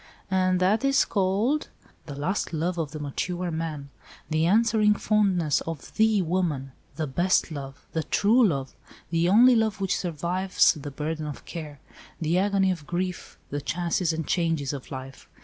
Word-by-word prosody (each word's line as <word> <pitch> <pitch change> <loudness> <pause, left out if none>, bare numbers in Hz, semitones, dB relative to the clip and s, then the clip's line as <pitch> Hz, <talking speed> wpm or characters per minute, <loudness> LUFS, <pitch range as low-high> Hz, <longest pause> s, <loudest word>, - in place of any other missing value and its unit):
"And 185 -1 +2
that 195 +7 +2
is 275 0 +3
called—?" 210 +9 0 0.4
"The 145 - -6
last 170 +5 -2
love 170 +2 -1
of 155 -3 -2
the 155 - -7
mature 175 +5 -3
man—the 155 0 -4
answering 215 +1 +4
fondness 195 -9 +2
of 165 -4 -6
the 220 -3 +3
woman—the 155 -4 -3
best 175 +5 +1
love—the 140 +2 -5
true 230 +5 +3
love—the 165 +3 -3
only 240 +5 +7
love 220 -2 +1
which 195 -1 0
survives 180 +3 +1
the 145 -2 -7
burden 155 +2 -4
of 145 - -8
care, 150 -4 -7 0.4
the 165 +2 +1
agony 195 -1 +2
of 160 -5 -6
grief, 180 +1 -4
the 145 0 -2
chances 175 +2 0
and 160 -1 -3
changes 165 -5 0
of 135 -3 -7
life. 135 0 -9
175 Hz, 150 wpm, -26 LUFS, 150-195 Hz, 0.4 s, only